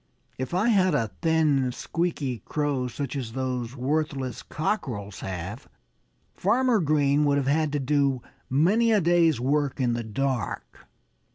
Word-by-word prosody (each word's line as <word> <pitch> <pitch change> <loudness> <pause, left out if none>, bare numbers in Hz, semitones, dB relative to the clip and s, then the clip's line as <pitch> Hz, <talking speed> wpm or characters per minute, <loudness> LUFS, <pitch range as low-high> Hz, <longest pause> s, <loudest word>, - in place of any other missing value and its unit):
"If 130 +6 -3
I 210 +6 +2
had 185 -7 +3
a 115 -7 0
thin, 150 -5 +2
squeaky 145 -3 -2
crow 145 0 -1
such 140 +3 -5
as 120 -5 -4
those 130 -2 -3
worthless 135 -2 -2
cockerels 120 - -3
have, 95 +6 -6 0.7
Farmer 235 +3 +2
Green 145 -3 +2
would 140 -1 +3
have 140 - 0
had 150 +2 +1
to 145 - +1
do 140 -2 +1 0.3
many 195 - +3
a 215 - +5
day's 170 -5 +3
work 140 +2 0
in 125 -2 +1
the 120 0 -2
dark." 125 -1 -3
140 Hz, 145 wpm, -26 LUFS, 125-160 Hz, 0.7 s, a